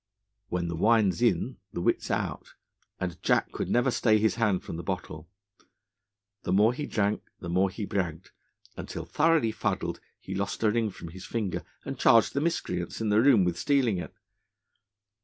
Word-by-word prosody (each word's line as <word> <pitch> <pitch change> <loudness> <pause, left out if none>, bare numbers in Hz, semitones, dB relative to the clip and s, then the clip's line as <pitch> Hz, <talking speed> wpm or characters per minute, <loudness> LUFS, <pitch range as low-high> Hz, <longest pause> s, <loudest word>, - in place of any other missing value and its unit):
When 90 -1 -1
the 85 - -3
wine 110 +2 +4
's 105 - -8
in, 125 +1 +1 0.2
the - - -3
wit 85 - +1
's - - -7
out, - - -3 0.4
and 90 -3 -4
Jack - - +2
could - - -4
never 120 +2 +3
stay 110 -3 +3
his 110 +1 +2
hand 105 -5 +1
from - - -6
the - - -4
bottle. 85 -3 -5 1.1
The - - -3
more 105 +5 +4
he 145 +3 -4
drank, 105 0 0 0.2
the 85 - -6
more 95 +2 +3
he 105 +2 -5
bragged, 90 -4 -3 0.4
until, - - -6
thoroughly 155 -7 +2
fuddled, 110 - -2 0.2
he 95 - -7
lost 100 +3 -3
a 110 - +4
ring 115 -1 +1
from 85 -3 -9
his 90 +3 -10
finger, 105 -6 -2 0.2
and - - -5
charged 115 -1 +5
the 140 - 0
miscreants 90 - -2
in 110 -1 -1
the 105 +1 +4
room 125 -7 +6
with 85 -1 -1
stealing 125 -9 +2
it. - - -6
105 Hz, 185 wpm, -28 LUFS, 90-115 Hz, 1.1 s, room